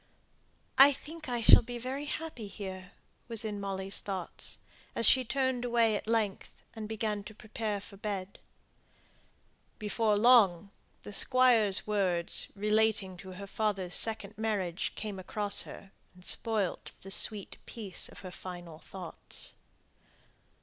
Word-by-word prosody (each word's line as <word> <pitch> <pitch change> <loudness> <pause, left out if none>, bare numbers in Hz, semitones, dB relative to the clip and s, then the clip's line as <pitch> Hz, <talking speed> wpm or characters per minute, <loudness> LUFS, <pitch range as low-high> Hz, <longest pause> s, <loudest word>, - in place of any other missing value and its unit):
"I 280 +1 +9
think 310 +1 -9
I 240 -1 -1
shall - - +9
be 240 +1 -7
very 260 +4 -4
happy 295 -8 -5
here," 190 -2 -8 0.3
was 230 -2 -3
in 210 -1 -3
Molly's 195 0 -1
thoughts, 190 -4 -5 0.4
as 230 - +3
she 260 +4 +6
turned 260 0 -1
away 235 -3 +2
at 205 - -5
length, 220 -4 -2
and 215 -1 -6
began 215 -2 -2
to 215 - -10
prepare 215 -1 -4
for 200 0 -13
bed. 200 -2 -5 1.4
Before 215 0 +1
long 205 -5 +5 0.3
the 205 - -8
Squire's 230 -4 +3
words, 185 -5 +2
relating 210 -2 +1
to 190 0 -10
her 200 +2 -8
father's 195 -3 -2
second 215 -2 +1
marriage, 195 -5 -1
came 205 -3 -5
across 205 +2 0
her, 195 - -11 0.2
and 180 0 -15
spoilt 215 -1 -1
the 195 - -7
sweet 205 0 +6
peace 205 -6 -4
of - - -13
her 185 -2 -8
final 175 -3 -9
thoughts. 180 -3 -7
210 Hz, 135 wpm, -31 LUFS, 195-230 Hz, 1.4 s, I